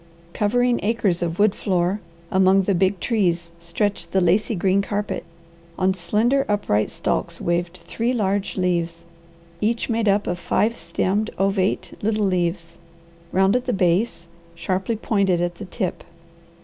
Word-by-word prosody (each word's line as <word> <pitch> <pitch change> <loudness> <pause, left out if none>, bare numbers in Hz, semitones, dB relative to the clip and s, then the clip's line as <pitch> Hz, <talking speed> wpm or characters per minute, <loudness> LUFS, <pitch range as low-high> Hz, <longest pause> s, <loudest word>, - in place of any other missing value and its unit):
Covering 245 +3 +2
acres 205 -5 0
of 170 0 -2
wood 205 -1 +4
floor, 185 +1 0 0.3
among 190 +1 +4
the 200 - +1
big 190 +1 +1
trees, 175 -7 0
stretched 170 +1 -2
the 190 - +4
lacy 190 +5 +2
green 190 +2 +2
carpet. 205 +1 -3 0.5
On 190 0 +2
slender, 220 +9 +1
upright 155 - +1
stalks - - -2
waved 175 +1 -1
three 230 +2 -2
large 200 -5 -1
leaves, 170 -2 -1 0.6
each 230 +3 0
made 230 -1 0
up 200 +1 +2
of 175 0 -2
five 220 +6 +1
stemmed, 190 +6 -1
ovate 195 0 0
little 215 0 +1
leaves, 175 -2 -1 0.5
round 190 +3 +3
at 250 0 0
the 250 - 0
base, 180 0 +1 0.3
sharply 190 +6 -1
pointed 200 -5 +1
at 175 0 -2
the - - -4
tip. 185 0 -3
195 Hz, 145 wpm, -22 LUFS, 175-210 Hz, 0.6 s, wood